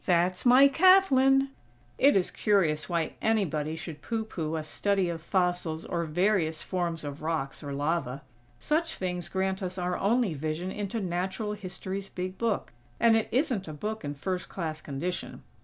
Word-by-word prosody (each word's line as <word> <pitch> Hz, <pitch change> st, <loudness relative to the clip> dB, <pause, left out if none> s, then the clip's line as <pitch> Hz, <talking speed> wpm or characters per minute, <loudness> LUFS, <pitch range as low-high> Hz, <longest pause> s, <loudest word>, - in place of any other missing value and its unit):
That's 180 Hz, +4 st, +2 dB
my 260 Hz, +3 st, +8 dB
Kathlyn!!" 275 Hz, -5 st, +5 dB, 0.5 s
It 280 Hz, +2 st, +6 dB
is 185 Hz, -, 0 dB
curious 175 Hz, -8 st, +1 dB
why 170 Hz, -2 st, -1 dB
anybody 160 Hz, -9 st, 0 dB
should 165 Hz, -2 st, -8 dB
pooh 225 Hz, -1 st, -2 dB
pooh 160 Hz, -6 st, -3 dB
a 160 Hz, -, -2 dB
study 195 Hz, +4 st, 0 dB
of 165 Hz, -1 st, -4 dB
fossils 175 Hz, -3 st, -1 dB
or 170 Hz, -1 st, -2 dB
various 165 Hz, -1 st, +1 dB
forms 170 Hz, -4 st, -2 dB
of 145 Hz, 0 st, -6 dB
rocks 155 Hz, -4 st, -2 dB
or 145 Hz, -2 st, -6 dB
lava. 145 Hz, -1 st, -1 dB, 0.3 s
Such 320 Hz, -, 0 dB
things 180 Hz, -2 st, -3 dB
grant 190 Hz, +1 st, -1 dB
us 185 Hz, 0 st, -4 dB
our 180 Hz, 0 st, -1 dB
only 225 Hz, -2 st, +2 dB
vision 155 Hz, +5 st, -3 dB
into 205 Hz, +3 st, -3 dB
Natural 190 Hz, +3 st, -2 dB
History's 195 Hz, 0 st, -5 dB
big 185 Hz, +1 st, -5 dB
book; 230 Hz, -, -1 dB, 0.3 s
and 230 Hz, -1 st, +5 dB
it 225 Hz, -, +1 dB
isn't 250 Hz, -, 0 dB
a 155 Hz, -, -6 dB
book 215 Hz, +9 st, -4 dB
in 145 Hz, 0 st, -4 dB
first 180 Hz, +5 st, -3 dB
class 160 Hz, -4 st, -4 dB
condition. 160 Hz, +6 st, -4 dB
180 Hz, 165 wpm, -28 LUFS, 160-210 Hz, 0.5 s, my